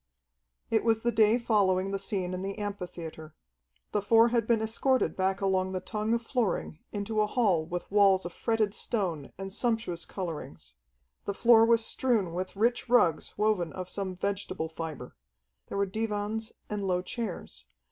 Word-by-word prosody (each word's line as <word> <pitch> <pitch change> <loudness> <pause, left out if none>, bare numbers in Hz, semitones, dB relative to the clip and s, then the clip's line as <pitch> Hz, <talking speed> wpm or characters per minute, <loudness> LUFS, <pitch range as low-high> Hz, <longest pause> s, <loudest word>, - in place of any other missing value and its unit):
It 220 - +3
was 225 -1 +2
the 240 - +2
day 215 +1 +4
following 195 -5 +2
the 195 - -1
scene 190 -2 -2
in 185 - -3
the 195 +1 -4
amphitheatre. 175 -6 -6 0.6
The 210 - +1
four 225 +3 +5
had 230 -2 +1
been 235 -2 +3
escorted 235 +4 +1
back 190 +1 0
along 190 -1 +1
the 185 - -1
tongue 215 +4 -1
of 235 - -3
flooring 225 - -1
into 215 +1 -1
a 210 - +2
hall 195 -9 +1
with 175 +1 -5
walls 195 -2 +5
of 175 - -5
fretted 225 -3 0
stone 180 - -2
and 195 0 -5
sumptuous 225 -8 -1
colorings. 165 - -6 0.5
The 200 - -2
floor 230 0 +6
was 230 -1 +4
strewn 220 -11 0
with 185 +3 -4
rich 235 +4 +1
rugs 180 -10 +3
woven 205 -6 +1
of 185 -1 -6
some 190 -2 -3
vegetable 190 -3 -3
fibre. 160 -6 -7 0.5
There - - -5
were 200 - +2
divans 215 +2 -2 0.2
and 210 -1 -3
low 180 -2 0
chairs. 180 - -6
200 Hz, 165 wpm, -29 LUFS, 185-225 Hz, 0.6 s, floor